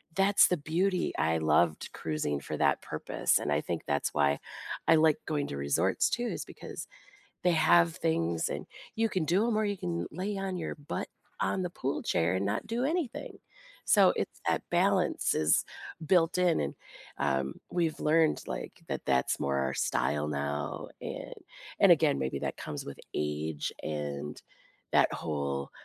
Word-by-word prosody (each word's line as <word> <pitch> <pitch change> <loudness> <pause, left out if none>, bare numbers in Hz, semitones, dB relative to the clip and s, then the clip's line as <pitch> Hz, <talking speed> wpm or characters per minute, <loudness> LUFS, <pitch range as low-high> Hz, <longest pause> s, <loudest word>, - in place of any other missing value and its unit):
that's 195 +1 +5
the 180 - +1
beauty. 175 +5 0
I 80 +1 +2
loved 80 +1 +2
cruising 75 -2 -2
for - - -5
that - - +2
purpose, - - 0
and 75 - -2
I 75 - +2
think 85 0 -3
that's 70 -1 0
why 70 0 +2 0.5
I 165 - +7
like 155 -1 +4
going 150 -2 -1
to 70 - -5
resorts, 70 +7 +2
too, 240 - -1
is - - -4
because - - -8 0.6
they 180 - +5
have 85 - +4
things, 80 0 0
and - - -4 0.3
you 225 0 +2
can 185 -6 -1
do 185 +7 +2
'em, 235 -2 +1
or 215 - +2
you 205 -1 -1
can 85 0 -2
lay 190 +5 -3
on 195 -1 -3
your 165 - -3
butt 145 -2 -5 0.3
on 190 - 0
the 180 - -2
pool 135 -5 -3
chair 85 +2 +1
and 95 +1 0
not 105 - -1
do 230 +3 -1
anything, 310 -3 -2 0.5
so, - - +6
it's - - -3
that - - +1
balance - - +2
is - - +3 0.4
built 165 +1 +3
in 180 -2 +3
and, 70 - -2 0.4
um, 70 -1 -1
we've 170 -3 0
learned, 155 +1 +3
like, - - -6
that - - -3
that's 65 - +1
more 70 0 0
our 65 0 0
style 75 +5 0
now, 70 0 -3
and - - -6 0.5
and - - +7
again, - - +3
maybe 65 +1 -2
that - - -3
comes 75 -1 -5
with 70 - -8 0.2
age, 75 0 -2
and 75 -1 -4 0.5
that - - +4
whole 70 -3 -3
85 Hz, 170 wpm, -30 LUFS, -, 0.6 s, I